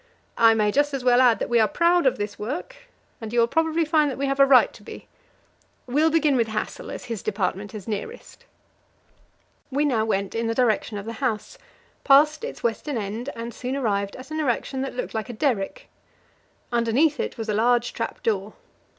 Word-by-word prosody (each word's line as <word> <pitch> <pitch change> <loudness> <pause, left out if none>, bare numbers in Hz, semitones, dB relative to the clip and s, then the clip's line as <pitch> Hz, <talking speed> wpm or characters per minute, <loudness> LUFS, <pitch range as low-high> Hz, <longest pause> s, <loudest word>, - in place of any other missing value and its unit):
I 225 -1 +6
may 210 -1 +2
just 290 +3 +1
as 265 - -4
well 250 0 +5
add 245 -3 +5
that - - -3
we 240 -1 +3
are 220 - +4
proud 340 0 +3
of 260 - +2
this 205 0 -5
work, 295 - -5 0.5
and 220 -1 -6
you 240 - +1
will 230 - +5
probably 320 +5 +1
find 305 -1 +2
that 265 - -5
we 280 - -1
have 275 0 -1
a 275 - +7
right 265 -2 +5
to - - -15
be. - - -11 0.8
We'll 295 +6 +2
begin 315 -3 +2
with 230 -3 +2
Hassel, 215 -1 -4
as - - -7
his 230 -4 -5
department 200 0 -3
is 205 -3 -8
nearest." 220 - -7 1.2
We 285 +2 0
now 240 -7 +1
went 200 -3 -1
in 230 0 -1
the 230 - -1
direction 225 -3 +1
of 200 - -6
the 230 - -5
house, 230 -6 -2 0.4
passed 300 +6 +5
its 485 - -6
western 235 +4 -2
end, 220 +5 -4
and 230 +1 -6
soon 255 +2 -4
arrived 200 -7 -1
at 255 +4 -11
an 310 - -3
erection 265 -1 -1
that 270 -2 -4
looked 250 - -4
like 220 +2 -4
a - - -5
derrick. 220 -6 -2 0.8
Underneath 245 +6 +2
it - - -3
was 225 -1 -5
a 210 - 0
large 240 +2 +2
trap - - -5
door. 210 -1 -1
240 Hz, 205 wpm, -24 LUFS, 220-280 Hz, 1.2 s, a